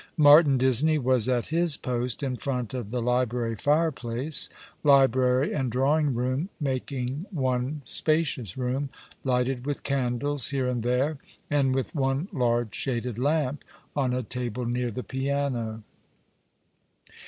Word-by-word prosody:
IMartin 145 Hz, -2 st, +7 dB
Disney 130 Hz, +5 st, +3 dB
was 130 Hz, -3 st, +1 dB
at 125 Hz, -2 st, 0 dB
his 170 Hz, -3 st, +2 dB
post 125 Hz, 0 st, -2 dB
in 130 Hz, -2 st, -1 dB
front 125 Hz, -3 st, -3 dB
of 120 Hz, -5 st, -4 dB
the 120 Hz, 0 st, -2 dB
library 125 Hz, -1 st, 0 dB
fireplace, 145 Hz, -1 st, 0 dB, 0.3 s
library 130 Hz, -1 st, +4 dB
and 130 Hz, -5 st, -1 dB
drawing 140 Hz, +2 st, +2 dB
room 130 Hz, +8 st, -1 dB
making 135 Hz, +2 st, -3 dB
one 130 Hz, -2 st, -1 dB
spacious 150 Hz, -, 0 dB
room, 130 Hz, +2 st, -1 dB, 0.3 s
lighted 125 Hz, -1 st, 0 dB
with 145 Hz, +1 st, -3 dB
candles 135 Hz, +1 st, -1 dB
here 135 Hz, -2 st, 0 dB
and 125 Hz, -2 st, -1 dB
there, 130 Hz, +5 st, 0 dB, 0.3 s
and 135 Hz, -3 st, +2 dB
with 135 Hz, +5 st, -2 dB
one 135 Hz, +2 st, 0 dB
large 120 Hz, -5 st, +1 dB
shaded 120 Hz, -3 st, -3 dB
lamp 145 Hz, 0 st, 0 dB, 0.3 s
on 135 Hz, -3 st, +1 dB
a 125 Hz, 0 st, -1 dB
tablo 125 Hz, +1 st, -4 dB
near 120 Hz, 0 st, -1 dB
the 125 Hz, +3 st, -5 dB
piano. 130 Hz, -5 st, -2 dB
130 Hz, 130 wpm, -27 LUFS, 125-145 Hz, 0.3 s, IMartin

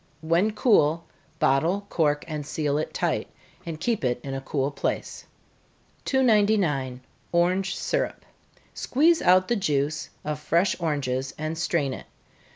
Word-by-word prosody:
When 170 Hz, +6 st, +2 dB
cool, 170 Hz, -, +3 dB, 0.3 s
bottle, 165 Hz, +9 st, +2 dB
cork, 150 Hz, -3 st, +1 dB
and 155 Hz, -2 st, -4 dB
seal 145 Hz, 0 st, -1 dB
it 155 Hz, -, -3 dB
tight, -, -, -1 dB, 0.4 s
and 160 Hz, -2 st, -5 dB
keep 225 Hz, +2 st, -1 dB
it 125 Hz, -1 st, 0 dB
in 135 Hz, -, -5 dB
a 135 Hz, -, -3 dB
cool 135 Hz, +1 st, -1 dB
place. -, -, -3 dB, 0.8 s
299. 200 Hz, -, +2 dB, 0.3 s
Orange 180 Hz, +3 st, +1 dB
Syrup. -, -, -2 dB, 0.5 s
Squeeze 320 Hz, +5 st, +2 dB
out 185 Hz, +1 st, +5 dB
the 240 Hz, -, +1 dB
juice 150 Hz, -6 st, -1 dB, 0.2 s
of 150 Hz, 0 st, -2 dB
fresh 170 Hz, +5 st, +2 dB
oranges, 135 Hz, -5 st, -2 dB
and 155 Hz, +1 st, -3 dB
strain 160 Hz, -5 st, 0 dB
it. -, -, -9 dB
160 Hz, 135 wpm, -25 LUFS, 145-195 Hz, 0.8 s, out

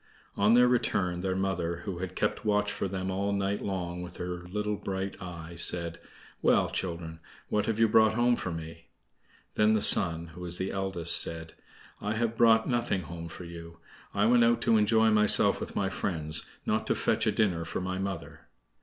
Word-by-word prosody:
On 105 Hz, +3 st, +3 dB
their 125 Hz, 0 st, +6 dB
return, 100 Hz, -8 st, 0 dB
their 95 Hz, 0 st, -2 dB
mother, 90 Hz, -3 st, -2 dB
who 95 Hz, -4 st, -5 dB
had 95 Hz, 0 st, -6 dB
kept -, -, -1 dB
watch 105 Hz, -1 st, +1 dB
for -, -, -3 dB
them 95 Hz, 0 st, -4 dB
all 100 Hz, +2 st, -1 dB
night 100 Hz, 0 st, -1 dB
long 90 Hz, -3 st, -4 dB
with 90 Hz, 0 st, -9 dB
her 90 Hz, 0 st, -6 dB
little 105 Hz, +2 st, -2 dB
bright 95 Hz, -1 st, -4 dB
eye, 85 Hz, -2 st, -8 dB
said: 85 Hz, 0 st, 0 dB, 0.4 s
"Well, -, -, +2 dB
children, 85 Hz, -2 st, -5 dB, 0.3 s
what 105 Hz, -1 st, 0 dB
have 110 Hz, -2 st, -1 dB
you 115 Hz, 0 st, +4 dB
brought 110 Hz, 0 st, +4 dB
home 120 Hz, +1 st, +3 dB
for 95 Hz, -, -5 dB
me?" 80 Hz, 0 st, -8 dB, 0.7 s
Then 110 Hz, +1 st, +3 dB
the -, -, +2 dB
Sun 85 Hz, -4 st, +6 dB
(who 85 Hz, +3 st, -12 dB
was 90 Hz, -1 st, -2 dB
the 95 Hz, -, -3 dB
eldest) 95 Hz, -3 st, +4 dB
said: 80 Hz, -1 st, -2 dB, 0.5 s
"I 105 Hz, +1 st, -2 dB
have 115 Hz, 0 st, -1 dB
brought 115 Hz, -1 st, +4 dB
nothing 120 Hz, -6 st, -1 dB
home 85 Hz, +2 st, -8 dB
for 85 Hz, -, -10 dB
you. 85 Hz, -1 st, -10 dB, 0.3 s
I 100 Hz, -, +1 dB
went 120 Hz, +1 st, +4 dB
out 115 Hz, 0 st, +3 dB
to 115 Hz, -1 st, +3 dB
enjoy 110 Hz, +1 st, +3 dB
myself 105 Hz, -1 st, +4 dB
with -, -, -7 dB
my 100 Hz, -, 0 dB
friends, 80 Hz, -5 st, -2 dB, 0.2 s
not -, -, -1 dB
to -, -, +1 dB
fetch -, -, 0 dB
a -, -, +3 dB
dinner 90 Hz, -6 st, 0 dB
for 80 Hz, -, -5 dB
my 95 Hz, 0 st, -4 dB
mother!" 95 Hz, -3 st, -6 dB
95 Hz, 195 wpm, -28 LUFS, 85-105 Hz, 0.7 s, their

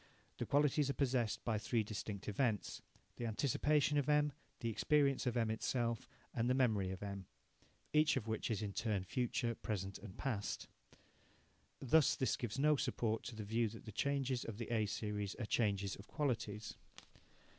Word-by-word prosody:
The -, -, -2 dB
qualities 145 Hz, 0 st, +3 dB
are -, -, +1 dB
possessed 125 Hz, -5 st, +1 dB
by 110 Hz, -3 st, +1 dB
three 115 Hz, +1 st, +1 dB
distinct 105 Hz, -1 st, -5 dB
events 105 Hz, 0 st, 0 dB, 0.4 s
the 120 Hz, -, -2 dB
anticipation 145 Hz, +5 st, +2 dB
of 145 Hz, -, -1 dB
M, 150 Hz, -1 st, +4 dB, 0.3 s
the 115 Hz, -, 0 dB
experience 140 Hz, +1 st, +2 dB
M 115 Hz, -2 st, +1 dB
itself, 115 Hz, 0 st, -1 dB, 0.2 s
and 120 Hz, +1 st, +1 dB
the 130 Hz, -, +4 dB
memory 110 Hz, -8 st, +2 dB
of 95 Hz, +1 st, -5 dB
M, 100 Hz, -2 st, -5 dB, 0.7 s
each 155 Hz, -1 st, +5 dB
of 115 Hz, -4 st, -3 dB
which 110 Hz, -1 st, -1 dB
is 110 Hz, -2 st, -1 dB
in 100 Hz, -1 st, -3 dB
turn 105 Hz, -4 st, 0 dB
future, 120 Hz, +3 st, 0 dB
present, 100 Hz, -4 st, -4 dB
and 100 Hz, -4 st, -10 dB
past. 115 Hz, -7 st, -2 dB, 1.1 s
Thus 140 Hz, +3 st, +4 dB
this 130 Hz, -, +1 dB
gives 120 Hz, -1 st, -4 dB
no 150 Hz, +1 st, +4 dB
support 115 Hz, -5 st, 0 dB
to 120 Hz, -, -5 dB
the 110 Hz, -, -5 dB
view 110 Hz, +2 st, +1 dB
that 115 Hz, +1 st, -11 dB
the 110 Hz, -, -6 dB
changes 135 Hz, +1 st, 0 dB
of 110 Hz, -3 st, -6 dB
the 115 Hz, 0 st, -5 dB
A 110 Hz, -2 st, +2 dB
series 105 Hz, -1 st, -2 dB
are 120 Hz, -, -3 dB
changes 100 Hz, -3 st, +1 dB
of 100 Hz, -, -12 dB
qualities. 110 Hz, -7 st, -2 dB
115 Hz, 170 wpm, -38 LUFS, 105-135 Hz, 1.1 s, each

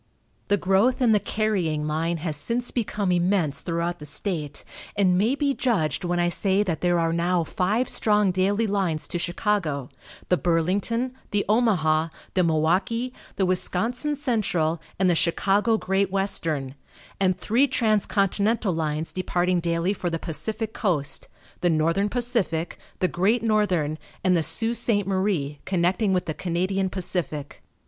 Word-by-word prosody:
The 205 Hz, -, +3 dB
growth 195 Hz, +8 st, +2 dB
in 245 Hz, -3 st, +3 dB
the 210 Hz, -, +4 dB
carrying 185 Hz, -9 st, -1 dB
line 165 Hz, +3 st, -1 dB
has 155 Hz, -3 st, -1 dB
since 235 Hz, +11 st, -3 dB
become 210 Hz, -5 st, -1 dB
immense 175 Hz, -4 st, +1 dB
throughout 170 Hz, +1 st, -2 dB
the 150 Hz, -, -8 dB
state, 150 Hz, -2 st, -2 dB, 0.3 s
and 185 Hz, -3 st, +3 dB
may 220 Hz, +8 st, +2 dB
be 285 Hz, -1 st, +1 dB
judged 205 Hz, -, 0 dB
when 175 Hz, 0 st, 0 dB
I 175 Hz, -, +2 dB
say 195 Hz, +3 st, +2 dB
that 175 Hz, -6 st, -3 dB
there 175 Hz, -1 st, +2 dB
are 165 Hz, -1 st, +1 dB
now 170 Hz, +1 st, +1 dB
five 205 Hz, +9 st, 0 dB
strong 210 Hz, -3 st, +2 dB
daily 200 Hz, +4 st, +1 dB
lines 190 Hz, -7 st, -1 dB
to 175 Hz, -, -2 dB
Chicago, 175 Hz, -, -1 dB, 0.4 s
the 180 Hz, -, +4 dB
Burlington, 195 Hz, +10 st, 0 dB, 0.2 s
the 205 Hz, -1 st, 0 dB
Omaha, 180 Hz, -9 st, +2 dB, 0.3 s
the 185 Hz, -, +3 dB
Milwaukee, 185 Hz, +10 st, +1 dB, 0.2 s
the 190 Hz, -, +1 dB
Wisconsin 225 Hz, +10 st, -1 dB
Central 195 Hz, -, 0 dB, 0.2 s
and 190 Hz, -, +2 dB
the 175 Hz, -, +4 dB
Chicago 200 Hz, +7 st, +2 dB
Great 195 Hz, -1 st, 0 dB
Western, 165 Hz, -8 st, 0 dB, 0.5 s
and 185 Hz, -2 st, +2 dB
three 235 Hz, +8 st, +2 dB
transcontinental 215 Hz, -3 st, +1 dB
lines 155 Hz, -1 st, -2 dB
departing 180 Hz, 0 st, 0 dB
daily 170 Hz, +2 st, 0 dB
for 180 Hz, -3 st, -3 dB
the 165 Hz, -, -2 dB
Pacific 210 Hz, +8 st, -3 dB
Coast, 150 Hz, -, 0 dB, 0.3 s
the 175 Hz, -, +2 dB
Northern 165 Hz, +6 st, +1 dB
Pacific, 230 Hz, -9 st, -1 dB, 0.2 s
the 185 Hz, -, +1 dB
Great 205 Hz, +7 st, +1 dB
Northern 185 Hz, -9 st, +1 dB, 0.2 s
and 185 Hz, -1 st, +3 dB
the 170 Hz, -, +2 dB
Sault 225 Hz, +8 st, +3 dB
Ste. 205 Hz, -3 st, +1 dB
Marie 185 Hz, -7 st, -1 dB
(connecting 190 Hz, +3 st, +1 dB
with 180 Hz, -2 st, +1 dB
the 155 Hz, -, -3 dB
Canadian 185 Hz, +3 st, -1 dB
Pacific). 165 Hz, -6 st, -3 dB
185 Hz, 150 wpm, -25 LUFS, 165-210 Hz, 0.5 s, the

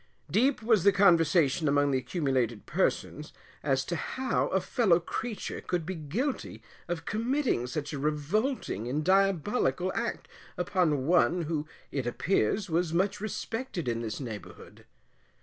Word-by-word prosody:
Deep 250 Hz, +2 st, +2 dB
was 220 Hz, -5 st, +3 dB
the 200 Hz, -, +7 dB
conversation 170 Hz, -5 st, +4 dB
among 145 Hz, 0 st, +3 dB
the 135 Hz, -, +2 dB
accumulated 130 Hz, -, -1 dB
persons, -, -, -1 dB, 0.3 s
as 135 Hz, -2 st, +1 dB
to 175 Hz, -, -2 dB
how 260 Hz, -, -1 dB
a 190 Hz, -, +1 dB
fellow 185 Hz, -2 st, +3 dB
creature 220 Hz, +6 st, -4 dB
could 175 Hz, -3 st, -2 dB
be 190 Hz, -, -3 dB
guilty 190 Hz, -, -3 dB, 0.2 s
of 165 Hz, -2 st, -4 dB
committing 235 Hz, -, 0 dB
such 145 Hz, +3 st, -4 dB
a 140 Hz, -, -3 dB
revolting 150 Hz, -, -1 dB
and 145 Hz, +4 st, -1 dB
diabolical 190 Hz, -, +2 dB
act -, -, -3 dB, 0.3 s
upon 170 Hz, -6 st, +1 dB
one, 175 Hz, +1 st, +3 dB
who, 155 Hz, -1 st, -2 dB, 0.2 s
it 135 Hz, -4 st, -2 dB
appears, 185 Hz, -, +1 dB
was 170 Hz, -1 st, 0 dB
much 195 Hz, +3 st, +1 dB
respected 215 Hz, -, -4 dB
in 115 Hz, -1 st, -1 dB
this 110 Hz, -2 st, -4 dB
neighbourhood. 115 Hz, -6 st, -9 dB
170 Hz, 140 wpm, -29 LUFS, 145-200 Hz, 0.3 s, the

